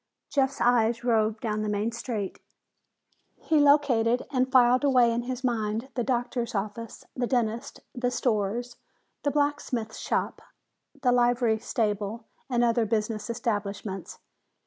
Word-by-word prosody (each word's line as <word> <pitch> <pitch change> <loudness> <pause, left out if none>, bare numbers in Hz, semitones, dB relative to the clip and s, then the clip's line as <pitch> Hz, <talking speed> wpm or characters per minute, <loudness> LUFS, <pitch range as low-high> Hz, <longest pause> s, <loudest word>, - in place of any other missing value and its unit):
Jeff's 275 -1 +1
eyes 235 -1 +3
roved 220 -2 +1
down 215 -2 -1
the 215 - -1
main 210 +2 0
street. 230 -4 -4 1.0
He 315 -2 +1
located 265 -5 +4
and 255 -1 +1
filed 250 0 +5
away 250 -4 +4
in 235 - 0
his 255 +1 -5
mind 225 0 -1
the 245 - -1
doctor's 240 -1 -1
office, 215 +3 -5
the 245 -1 -1
dentist, 235 +1 -1
the 245 -1 -1
stores, 235 0 -1 0.4
the 290 - +1
blacksmith 285 -6 -1
shop, - - -2 0.6
the 250 - +4
livery 240 -2 +3
stable 215 -1 -2 0.2
and 240 -2 +2
other 235 -1 +2
business 215 +1 -1
establishments. 205 -4 -3
235 Hz, 130 wpm, -27 LUFS, 220-250 Hz, 1.0 s, filed